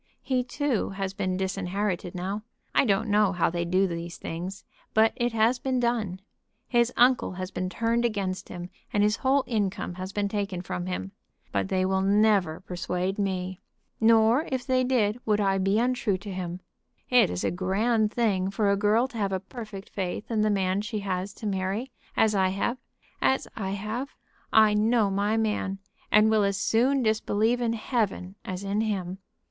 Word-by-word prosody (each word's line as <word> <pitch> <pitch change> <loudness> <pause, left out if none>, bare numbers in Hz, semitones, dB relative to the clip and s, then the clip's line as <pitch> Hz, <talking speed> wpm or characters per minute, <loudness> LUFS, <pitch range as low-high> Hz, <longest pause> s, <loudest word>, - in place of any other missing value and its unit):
He 255 -2 +1
too 265 -2 -1
has 195 -1 -4
been 185 -1 -1
disinherited 190 -1 -2
now. 190 +4 -3 0.3
I - - +4
don't 205 0 +2
know 205 -2 +3
how 175 -2 +1
they 170 0 -1
do 185 +3 +2
these 170 -1 -5
things, 185 +3 -6 0.3
but 220 +1 +5
it 240 -1 0
has 230 +3 +3
been 260 -1 0
done. 220 -6 -1 0.5
His 240 -1 +2
uncle 250 -4 +4
has 185 +1 -5
been 185 0 -3
turned 230 +5 0
against 200 -5 -2
him, 175 +1 -7 0.2
and 205 - +2
his 210 +1 +2
whole 270 +1 +2
income 205 -6 -1
has 185 +1 -5
been 205 0 0
taken 200 -3 -3
from 90 - -4
him. 95 +1 -4 0.4
But 100 -1 -1
they 185 0 +1
will 190 0 +1
never 200 -4 +3
persuade 180 +2 -3
me. 185 -2 -2 0.4
Nor, 225 +5 +4
if 260 -1 -2
they 255 -1 +2
did, 240 -3 +1
would 210 -1 +1
I 195 -1 +2
be 195 +2 +2
untrue 245 -4 +1
to 200 +2 -8
him. 180 -1 -5 0.5
It 250 -1 +6
is 90 0 -3
a - - +1
grand 210 +5 +1
thing 200 -6 +1
for 200 0 +1
a - - +3
girl 215 +5 +3
to 235 -4 -7
have 200 -2 0
a 190 - 0
perfect 205 0 -9
faith 190 +3 -4
in 220 -2 +1
the 215 - +3
man 190 -1 +1
she 210 0 -4
has 190 0 -2
to - - -9
marry, 200 +5 -2 0.3
as 220 -1 +4
I 190 -2 +3
have 200 +7 -1 0.4
as 265 - +2
I 195 -4 -3
have. 220 +7 -4 0.4
I 215 -1 +6
know 215 0 +3
my 205 +3 +1
man, 210 -3 -1 0.3
and 215 +1 +6
will 215 -1 +4
as 200 -1 +1
soon 245 +6 +2
disbelieve 220 +2 +1
in 230 -1 +1
Heaven 215 -5 -1
as 185 0 -5
in 200 +2 0
him. 190 -4 -2
205 Hz, 185 wpm, -27 LUFS, 185-225 Hz, 0.5 s, It